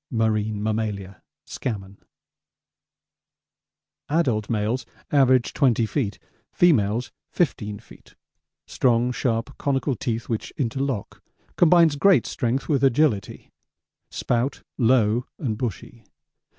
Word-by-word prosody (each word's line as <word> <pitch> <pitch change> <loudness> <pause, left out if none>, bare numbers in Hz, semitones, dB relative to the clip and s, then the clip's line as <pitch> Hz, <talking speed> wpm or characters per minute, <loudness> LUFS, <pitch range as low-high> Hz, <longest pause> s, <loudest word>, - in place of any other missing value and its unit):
'Marine 110 -2 0
Mammalia' 105 -3 -3 0.2
Scammon: 100 -5 -5 2.1
Adult 125 -10 +1
males 115 +3 -1 0.3
average 130 -4 +3
20 130 -5 +2
feet; 110 -4 -2 0.3
females 120 - +2 0.2
15 105 - -1
feet. 110 - -18 0.5
Strong 120 -1 +1
sharp 125 +1 -2
conical 135 -1 0
teeth 115 -2 -3
which 115 -2 -3
interlock. 135 -3 -3 0.3
Combines 170 -3 +5
great 195 +4 +4
strength 125 0 -2
with 140 -3 +1
agility. 130 -5 +1 0.6
Spout 125 +3 -2 0.2
'low 120 -1 +3
and 120 -7 -2
bushy.' 115 0 -5
120 Hz, 95 wpm, -24 LUFS, 110-135 Hz, 2.1 s, Combines